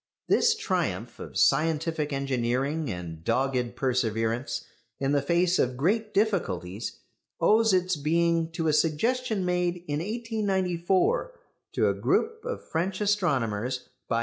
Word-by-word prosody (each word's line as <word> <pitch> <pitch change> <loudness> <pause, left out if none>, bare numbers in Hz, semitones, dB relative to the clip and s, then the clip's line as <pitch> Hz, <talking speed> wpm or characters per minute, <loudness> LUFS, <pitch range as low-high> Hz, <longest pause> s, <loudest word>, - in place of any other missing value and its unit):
This 465 -1 +4
triumph 435 0 -2
of - - -7
scientific 160 -1 +2
engineering 135 +2 -1
and 85 -3 -7
dogged 125 +2 0
perseverance 120 -1 -1 0.3
in 135 0 0
the 145 -1 +3
face 175 +3 +2
of 125 0 +1
great 210 - +1
difficulties 115 - -1 0.4
owes 225 +1 +4
its 185 -1 +2
being 165 +2 +1
to 165 -1 -1
a 155 - +3
suggestion 210 +7 +1
made 180 -1 0
in 145 0 -1
1894 205 - 0 0.3
to - - +2
a - - +2
group 450 0 0
of 485 0 -5
French 185 +4 -1
astronomers 130 - 0 0.2
by 115 - 0
M. - - +2
165 Hz, 130 wpm, -27 LUFS, 130-195 Hz, 0.4 s, This